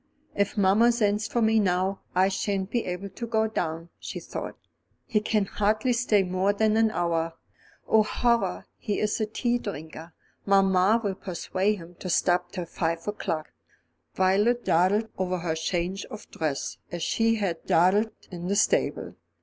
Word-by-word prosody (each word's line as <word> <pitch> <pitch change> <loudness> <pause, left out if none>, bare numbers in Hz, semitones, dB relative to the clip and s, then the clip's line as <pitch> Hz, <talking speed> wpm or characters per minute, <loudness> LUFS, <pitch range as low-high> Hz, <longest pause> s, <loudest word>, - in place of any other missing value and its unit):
"If 200 0 -1
mamma 205 +5 +5
sends 210 -3 +1
for 235 - 0
me 220 0 +4
now, 190 0 0
I 185 +1 +5
shan't 195 0 -2
be 240 - 0
able 180 +2 -4
to 235 +5 -6
go 220 -1 +1
down," 165 -5 -3
she - - -6
thought. - - -6 0.5
"He 215 - +1
can 210 -1 +1
hardly 215 +5 +1
stay 230 -4 +3
more 185 +2 +1
than 215 +1 +2
an 225 0 +4
hour. 165 -4 -1 0.5
Oh, 220 - +5
horror! 235 +2 0
he 210 -3 -2
is 210 +1 0
a 215 - 0
tea 240 +2 0
drinker; 160 -4 -8 0.3
mamma 195 +2 +4
will 200 -2 0
persuade 190 +2 -1
him 175 -2 -11
to 185 - -5
stop 175 +1 +2
till 180 -3 -4
five 165 +1 -3
o'clock." 165 -6 -3 0.6
Violet 205 +6 +2
dawdled 190 +6 +3
over 185 -1 0
her 170 -2 -2
change 175 +4 -2
of 215 - -10
dress 155 -4 -3
as 175 -2 -4
she 225 0 +2
had 190 -6 -2
dawdled 190 +6 +4 0.2
in 175 -1 -6
the 200 - +1
stable. 210 - +1
195 Hz, 165 wpm, -26 LUFS, 180-215 Hz, 0.6 s, mamma